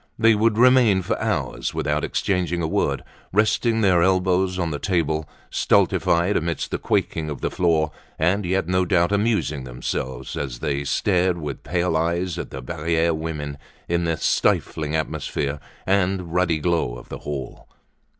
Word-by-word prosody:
They 115 0 +5
would 110 +1 +2
remain 120 -6 +5
for - - 0
hours - - -2
without 75 +1 0
exchanging 90 -4 0
a - - +1
word, - - 0 0.3
resting 110 +3 +2
their 90 -4 +4
elbows 95 0 +2
on 85 -3 -1
the 75 - -3
table, 80 -5 0 0.2
stultified 85 +4 +2
amidst 85 0 -1
the - - -2
quaking 80 -1 -1
of 75 - -6
the - - -1
floor, 80 -3 +1 0.3
and 90 +6 +2
yet 95 -1 0
no 90 0 +2
doubt 85 0 +2
amusing 100 - 0
themselves 65 0 -4
as 65 -4 -4
they 70 +2 -2
stared 90 +5 +1
with 75 -4 -5
pale 85 0 0
eyes 85 +2 0
at - - -5
the 65 -1 -7
Barriere 80 +3 0
women 75 -3 -4 0.3
in 85 0 0
the 80 -1 0
stifling 75 0 +1
atmosphere 75 -2 -2 0.3
and 95 -3 0
ruddy 90 -2 +2
glow 80 -7 0
of - - -13
the - - -6
hall. 70 -2 -6
85 Hz, 160 wpm, -23 LUFS, 75-95 Hz, 0.3 s, They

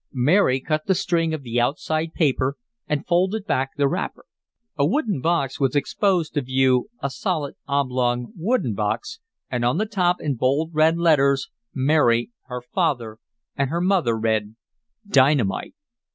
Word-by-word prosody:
Mary 135 +1 +3
cut 155 +3 -2
the 190 - +3
string 165 -2 0
of 155 -3 -4
the 120 -1 0
outside 155 +5 -1
paper, 135 -3 +1 0.3
and 150 -2 -2
folded 190 +4 +1
back 135 -9 0
the 140 -1 +3
wrapper. - - -4 0.5
A 140 - +1
wooden 205 - 0
box 150 -5 0
was 135 -1 +1
exposed 175 +2 +1
to 145 - 0
view, 130 +2 +2
a 140 - -1
solid, 155 -4 -2
oblong, 125 - 0
wooden 185 - 0
box, 105 - -3 0.3
and 125 -2 -1
on 120 +1 +2
the 215 - +1
top, 180 -4 +1
in 145 -2 -1
bold, 140 +7 +1
red 160 +2 +3
letters 150 0 +2 0.2
Mary, 130 - +2
her 125 -1 -6
father 125 - -2 0.4
and 140 -2 0
her 170 +3 -1
mother 175 - +2
read: 110 -1 -1 0.5
DYNAMITE! 135 - +2
140 Hz, 150 wpm, -23 LUFS, 130-170 Hz, 0.5 s, Mary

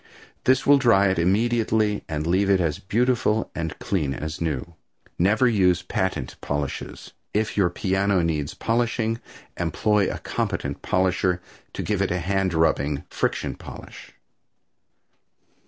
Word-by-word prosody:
This 130 +1 +3
will 140 0 +6
dry 100 -7 +4
it 95 -2 0
immediately 110 +2 +1
and 75 -1 -2
leave 95 +4 +2
it 95 -1 +4
as 80 -4 0
beautiful 110 +1 +1
and 80 -1 -4
clean 95 - -1
as 75 +1 -5
new. 80 +1 -2 0.5
Never 105 +8 +4
use 90 -6 +3
patent 90 -8 -2
polishes. 70 -1 -4 0.2
If 110 0 0
your 95 -4 +3
piano 95 0 +1
needs 75 -3 -1
polishing 115 -1 0 0.4
employ 100 +4 +1
a - - -4
competent - - -3
polisher 90 -1 +1 0.3
to - - -4
give 105 -2 -1
it 95 - +1
a 90 - 0
hand 95 0 0
rubbing 75 -3 +1
friction - - -1
polish. - - -11
95 Hz, 135 wpm, -24 LUFS, 85-110 Hz, 0.5 s, will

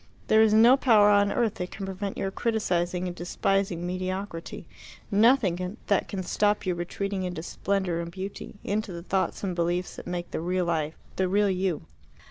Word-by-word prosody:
There 220 - +6
is 220 -1 +5
no 230 +5 +7
power 220 -6 +5
on 205 0 +4
earth 230 -2 +1
that 180 - -3
can 195 - -6
prevent 195 +1 -4
your 195 - -2
criticizing 180 -6 0
and 175 -1 -4
despising 180 0 -1
mediocrity 185 -1 -4 0.5
nothing 200 -4 +3
that 200 - +1
can 190 -2 -4
stop 205 +3 +1
you 185 - +1
retreating 190 +3 -3
into 180 -3 -4
splendour 190 -2 -1
and 170 0 -4
beauty 190 +4 -7
into 210 0 -2
the 170 -1 -7
thoughts 190 +2 -1
and 185 -3 -2
beliefs 175 +1 -1
that - - -9
make 175 -1 -4
the - - -3
real 180 +1 0
life 160 -2 -1 0.2
the 190 - +2
real 200 +1 +3
you." 185 -3 -1
190 Hz, 180 wpm, -27 LUFS, 175-205 Hz, 0.5 s, no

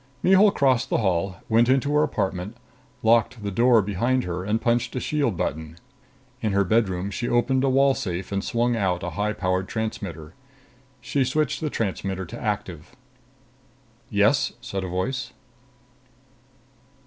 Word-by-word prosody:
Mihul 195 +3 +6
crossed 130 -9 +1
the - - +1
hall, 95 -3 0
went 115 +2 +3
into 135 +2 +2
her 150 - +4
apartment, 100 -6 -2 0.5
locked 115 0 +2
the 100 - -3
door 115 +1 +4
behind 120 +7 0
her 90 0 -4
and 105 +3 0
punched 120 +2 0
a - - 0
shield 140 - -1
button. 80 0 -4 0.6
In 110 -3 0
her 100 0 +3
bedroom, 100 -2 0
she 120 +3 -3
opened 130 +2 +2
a 135 - +3
wall 135 +1 +4
safe 90 -5 -4
and 100 0 -1
swung 120 0 0
out 95 -4 0
a 90 - -3
high 105 +6 -1
powered 95 -1 -1
transmitter. 90 -8 -5 0.7
She 135 +2 0
switched 150 +4 -1
the 155 - -1
transmitter 95 -5 -3
to 85 - -9
active. 95 -2 -4 1.1
"Yes?" 105 +6 +2
said 100 -5 -5
a - - -4
voice. 120 +10 -3
110 Hz, 150 wpm, -24 LUFS, 95-125 Hz, 1.1 s, Mihul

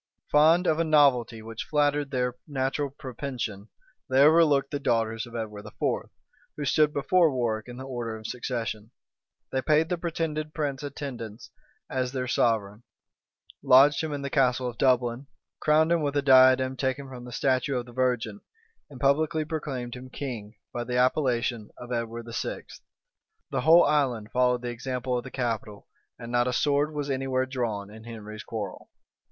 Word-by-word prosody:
Fond 160 +4 +5
of 160 -1 +2
a - - +3
novelty 135 -8 +3
which 115 0 -6
flattered 145 -1 +1
their 125 -2 -1
natural 140 0 -1
propension, 125 -6 -6 0.4
they 130 +1 +5
overlooked 150 -3 +5
the 145 - -2
daughters 115 -4 0
of 120 - -11
Edward 105 -3 -5
IV., 105 - -2 0.5
who 145 - -3
stood 150 +2 +3
before 160 +3 +3
Warwick 115 -4 -1
in 120 0 -9
the 130 - -7
order 120 -4 -4
of 110 - -13
succession; 115 -3 -4 0.6
they 130 - 0
paid 155 +3 +2
the 180 - -1
pretended 155 -2 -3
prince 145 -4 -2
attendance 130 -6 -7 0.4
as 130 -1 -2
their 130 -1 -2
sovereign, 110 -4 0 0.8
lodged 135 +2 +6
him 160 - -3
in 145 -1 -4
the 140 - -4
Castle 130 -2 +2
of 120 -2 -7
Dublin, 125 0 +2 0.3
crowned 155 +2 +3
him 170 -1 +3
with 145 -1 -1
a 140 - +1
diadem 130 -1 +6
taken 130 +1 -2
from 125 -2 -9
a - - -9
statue 130 +2 0
of 120 - -3
the 120 - -13
Virgin, 130 - -1 0.5
and 135 -3 -11
publicly 155 +3 +2
proclaimed 135 -6 -4
him 130 +1 -10
king, 115 -6 -6 0.2
by 120 - -2
the 125 +1 -2
appellation 125 -4 +1
of 120 0 -9
Edward 115 -1 -3
VI. - - -3 0.9
The 135 - 0
whole 165 +5 +7
island 125 -8 0
followed 125 -1 +2
the 120 - -2
example 125 +1 -3
of - - -8
the 130 - -8
capital; 115 -5 -4 0.3
and 115 0 -8
not 120 0 +2
a 125 - 0
sword 145 +3 +2
was 145 -2 -3
any 135 0 -2
where 130 0 +1
drawn 115 -6 -3
in 110 +1 -12
Henry's 110 -2 -8
quarrel. 105 -4 -6
130 Hz, 170 wpm, -27 LUFS, 120-145 Hz, 0.9 s, whole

